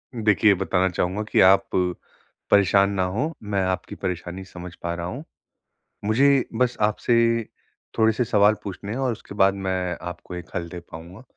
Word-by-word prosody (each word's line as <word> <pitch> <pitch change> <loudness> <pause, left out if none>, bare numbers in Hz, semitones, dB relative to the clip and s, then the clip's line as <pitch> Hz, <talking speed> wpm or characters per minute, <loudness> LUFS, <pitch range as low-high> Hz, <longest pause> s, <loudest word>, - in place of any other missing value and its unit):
देखिए, 110 -1 +3
ये 100 - +5
बताना 95 0 +1
चाहूँगा 90 +4 -1
कि - - +3
आप 95 +1 +5 0.8
परेशान 100 0 +5
ना 95 -2 0
हो, 120 - -2
मैं 100 -2 -1
आपकी 95 0 -3
परेशानी 90 0 -5
समझ 90 -1 -10
पा 85 0 -2
रहा 85 - -5
हूँ। 130 - -6 0.8
मुझे 135 +5 +4
बस 125 -1 +1
आपसे 110 +3 +1 0.8
थोड़े-से 110 +2 +3
सवाल 105 -1 +4
पूछने 100 +1 -6
हैं 120 - -3
और 130 -2 0
उसके 110 -2 -10
बाद 95 -1 +4
मैं 90 -2 -1
आपको 90 +1 -9
एक 90 - -8
हल 85 -1 -3
दे 90 +1 -8
पाऊँगा। 85 +7 -10
95 Hz, 170 wpm, -24 LUFS, 90-110 Hz, 0.8 s, ये